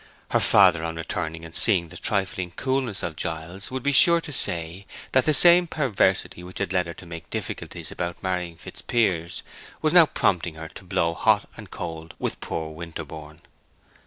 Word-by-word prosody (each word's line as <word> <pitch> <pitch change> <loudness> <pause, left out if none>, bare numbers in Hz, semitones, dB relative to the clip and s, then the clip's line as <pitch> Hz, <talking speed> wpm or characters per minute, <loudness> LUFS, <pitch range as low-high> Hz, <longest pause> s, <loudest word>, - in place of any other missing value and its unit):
Her - - +3
father 90 -5 +5
on 80 0 -4
returning 80 0 -4
and 80 - -12
seeing 90 -7 +4
the - - -12
trifling 95 -2 -2
coolness 130 -6 -2
of 85 -2 -4
Giles 85 +5 -5
would 130 -1 -5
be 145 - +2
sure 170 +4 +6
to 160 - -9
say 85 - -3 0.2
that 130 -1 +3
the 155 - +3
same 175 +3 +7
perversity 105 - 0
which 90 +1 -10
had 95 - -2
led 90 -2 +1
her 85 - -6
to - - -12
make 80 -2 -9
difficulties - - -5
about 85 -1 -5
marrying 90 -2 -2
Fitzpiers 90 -8 -2 0.4
was - - 0
now - - +8
prompting 85 -2 0
her 80 0 -8
to 95 - -12
blow 85 -2 0
hot - - +2
and - - -11
cold 80 0 -7
with - - -4
poor 80 -1 -4
Winterborne. 80 -1 -9
90 Hz, 180 wpm, -24 LUFS, 80-100 Hz, 0.4 s, now